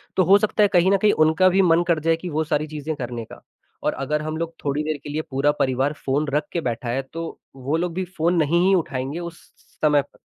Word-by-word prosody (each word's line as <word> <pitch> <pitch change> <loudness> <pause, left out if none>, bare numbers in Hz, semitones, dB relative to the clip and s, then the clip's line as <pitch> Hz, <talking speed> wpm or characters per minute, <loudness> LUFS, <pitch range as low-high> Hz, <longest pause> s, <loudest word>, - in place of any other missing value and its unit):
तो 185 - +4
हो 195 +4 +7
सकता 210 0 +1
है - - +6
कहीं 180 +1 +4
न 200 - +4
कहीं 205 +2 +3
उनका 160 +4 +4
भी 190 +2 +3
मन 170 -2 +4
कर 170 -2 +2
जाए 165 +2 +2
कि 180 +2 -6
वो 155 0 0
सारी 155 -1 -1
चीज़ें 155 0 -5
करने 120 -4 -5
का। - - -13 0.4
और - - +1
अगर 150 +3 -2
हम 155 +1 -4
लोग 165 0 -4
थोड़ी 145 +1 0
देर 155 -1 -2
के - - -7
लिए 150 +2 -2
पूरा 135 +2 +2
परिवार 130 +2 +1
फ़ोन 145 +3 0
रख 150 0 0
के 170 - -2
बैठा 120 -3 -3
है 130 +3 0
तो 165 0 -6 0.2
वो 135 +4 -2
लोग 175 0 -2
भी 185 +2 -2
फ़ोन 170 +2 +2
नहीं 170 +4 +2
ही 195 - +4
उठाएँगे 140 -2 -2
उस 170 -1 -8 0.4
समय 150 -2 +4
प 140 - -19
155 Hz, 255 wpm, -22 LUFS, 145-170 Hz, 0.4 s, हो